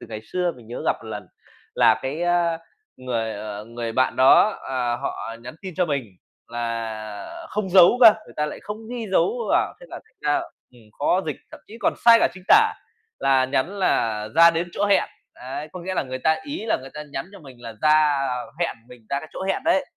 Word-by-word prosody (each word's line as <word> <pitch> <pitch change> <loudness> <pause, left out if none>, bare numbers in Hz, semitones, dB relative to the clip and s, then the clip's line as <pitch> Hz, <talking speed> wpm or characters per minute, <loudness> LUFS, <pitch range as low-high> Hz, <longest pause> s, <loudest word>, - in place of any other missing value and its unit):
từ - - -10
ngày 110 -1 -7
xưa 180 +7 -1
mình 120 - -15
nhớ 120 - -6
gặp - - +2
1 110 - -10
lần 105 -3 -6 0.5
là - - +4
cái, 140 +6 -3
ơ, 175 -1 +1 0.4
người, 115 -3 -3
ờ, 105 0 -6
người 115 0 -5
bạn 130 +2 +1
đó, 135 +11 +6
ờ, 125 -2 -1
họ 115 - -5
nhắn 135 - -9
tin 185 -3 -7
cho 180 - +2
mình 140 -5 -1 0.4
là 115 - -5
không 210 -2 -2
dấu 185 +6 +7
cơ, 225 -3 +10
người - - -15
ta 150 0 0
lại - - -7
không 210 +1 -5
ghi 235 -3 -4
dấu 465 - +1
vào - - +2
thế - - -12
là - - -7
thành 445 +2 -32
ra, - - +1 0.3
ừm, 120 -2 -18 0.2
khó 180 +6 +2
dịch, 150 - -3
thậm - - -12
chí 225 +2 -12
còn - - +1
sai 230 -1 +9
cả - - +4
chính 185 - -12
tả, 440 +1 +6 0.5
là 135 -1 +3
nhắn 135 +9 -1
là 110 - 0
"Ra 170 +1 +8
đến 170 +1 -2
chỗ 205 - -1
hẹn.'' 200 -1 +3 0.3
Đấy, 135 +4 -7
có 180 - -7
nghĩa 185 +2 -4
là - - +1
người 130 -1 -6
ta 160 +4 +2
ý 285 -4 -5
là - - +2
người 135 0 -11
ta 150 - -6
nhắn - - -4
cho - - -11
mình 130 -5 -14
là 115 - -7
ra, 155 -2 +4
ờ, 125 -1 -4
hẹn 170 - -1
mình 120 -3 -15
ra 140 - 0
cái 155 - -11
chỗ - - -6
hẹn 195 0 -1
đấy, 285 -4 +3
150 Hz, 230 wpm, -23 LUFS, 120-190 Hz, 0.5 s, cơ